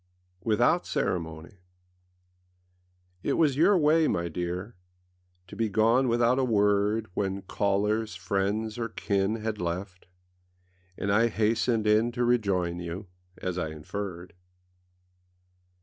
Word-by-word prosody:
WITHOUT 120 Hz, +10 st, +2 dB
CEREMONY 80 Hz, +1 st, -3 dB, 1.6 s
IT -, -, 0 dB
was 150 Hz, -5 st, +3 dB
your 180 Hz, +7 st, +5 dB
way, 155 Hz, 0 st, +4 dB
my 85 Hz, 0 st, -1 dB
dear, 90 Hz, +6 st, -4 dB, 0.7 s
To 90 Hz, -, -11 dB
be 115 Hz, -1 st, 0 dB
gone 115 Hz, +6 st, +3 dB
without 120 Hz, +2 st, +3 dB
a -, -, +2 dB
word 105 Hz, -1 st, +2 dB
When 95 Hz, 0 st, -2 dB
callers, 105 Hz, +3 st, 0 dB
friends, 105 Hz, +3 st, -2 dB
or 115 Hz, -1 st, -2 dB
kin 100 Hz, 0 st, 0 dB
Had 110 Hz, -2 st, -4 dB
left, 90 Hz, +2 st, -4 dB, 0.9 s
and 100 Hz, -, -1 dB
I 110 Hz, +3 st, +4 dB
hastened 110 Hz, +1 st, +1 dB
in 110 Hz, +3 st, +3 dB
To 120 Hz, +1 st, 0 dB
rejoin 95 Hz, -8 st, +1 dB
you, 90 Hz, +3 st, -6 dB, 0.3 s
as 90 Hz, 0 st, -3 dB
I 80 Hz, -, -2 dB
inferred. 90 Hz, +3 st, -6 dB
105 Hz, 120 wpm, -28 LUFS, 95-115 Hz, 1.6 s, your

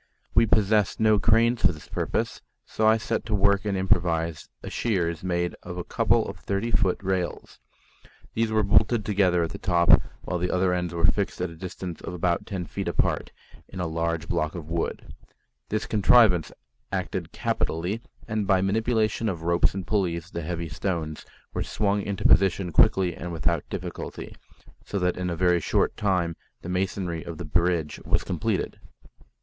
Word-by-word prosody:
We 115 Hz, 0 st, +5 dB
possessed 105 Hz, -1 st, +2 dB
no 110 Hz, -1 st, +4 dB
cranes 115 Hz, +2 st, +3 dB
for 90 Hz, -, +5 dB
this 75 Hz, -2 st, -12 dB
purpose, -, -, -2 dB, 0.2 s
so 110 Hz, -, 0 dB
I 110 Hz, +1 st, +6 dB
set 115 Hz, 0 st, -2 dB
to 110 Hz, -, 0 dB
work 100 Hz, 0 st, +3 dB
and 100 Hz, -2 st, 0 dB
improvised 85 Hz, -3 st, 0 dB
a -, -, -5 dB
shears 85 Hz, -6 st, -1 dB
made 90 Hz, -1 st, -1 dB
of 90 Hz, -1 st, -7 dB
a 90 Hz, -, -3 dB
couple -, -, +2 dB
of -, -, -7 dB
thirty 100 Hz, +4 st, -2 dB
foot 95 Hz, -2 st, +2 dB
rails. 95 Hz, -2 st, -3 dB, 0.7 s
These 115 Hz, 0 st, 0 dB
were 110 Hz, -1 st, +2 dB
bolted 105 Hz, +2 st, +3 dB
together 95 Hz, -4 st, +2 dB
at 80 Hz, -, -3 dB
the -, -, -7 dB
top, 85 Hz, -3 st, +5 dB, 0.2 s
while 90 Hz, -, -2 dB
the 90 Hz, +1 st, -1 dB
other 90 Hz, 0 st, +2 dB
ends 90 Hz, -1 st, -1 dB
were 85 Hz, 0 st, +3 dB
fixed 100 Hz, +4 st, 0 dB
at 90 Hz, -1 st, -2 dB
a -, -, -11 dB
distance 90 Hz, 0 st, -7 dB
of 90 Hz, -, -6 dB
about 85 Hz, 0 st, 0 dB
ten 95 Hz, -3 st, -4 dB
feet -, -, -5 dB
apart -, -, 0 dB, 0.4 s
in -, -, -9 dB
a 90 Hz, -, -1 dB
large 85 Hz, 0 st, -2 dB
block 80 Hz, -2 st, -1 dB
of 80 Hz, -3 st, -7 dB
wood. 85 Hz, 0 st, -3 dB, 0.6 s
This 110 Hz, 0 st, -1 dB
contrivance 105 Hz, -5 st, +4 dB, 0.4 s
acted -, -, -3 dB
capitally, 90 Hz, +8 st, -2 dB, 0.3 s
and 110 Hz, -3 st, -1 dB
by 95 Hz, -2 st, +4 dB
manipulation 110 Hz, +2 st, +1 dB
of 85 Hz, -4 st, -4 dB
ropes 85 Hz, +2 st, +2 dB
and 95 Hz, -2 st, -4 dB
pulleys 85 Hz, -4 st, -1 dB
the 85 Hz, -, -4 dB
heavy 85 Hz, +1 st, -4 dB
stones 80 Hz, -1 st, -3 dB, 0.3 s
were -, -, -2 dB
swung 100 Hz, 0 st, 0 dB
into 100 Hz, -1 st, -4 dB
position 95 Hz, -1 st, +3 dB
quickly 90 Hz, +3 st, +4 dB
and 85 Hz, +1 st, -6 dB
without 85 Hz, -1 st, -1 dB
difficulty, -, -, -6 dB, 0.5 s
so 100 Hz, -, -4 dB
that 90 Hz, -1 st, +1 dB
in 90 Hz, -1 st, -2 dB
a 85 Hz, -, -2 dB
very 90 Hz, 0 st, +3 dB
short -, -, +1 dB
time 90 Hz, -5 st, 0 dB, 0.3 s
the 85 Hz, -, -6 dB
masonry 90 Hz, -2 st, -2 dB
of 85 Hz, -2 st, -7 dB
the 90 Hz, -, -6 dB
bridge 85 Hz, 0 st, 0 dB
was -, -, +1 dB
completed. -, -, -2 dB
90 Hz, 175 wpm, -26 LUFS, 85-100 Hz, 0.7 s, I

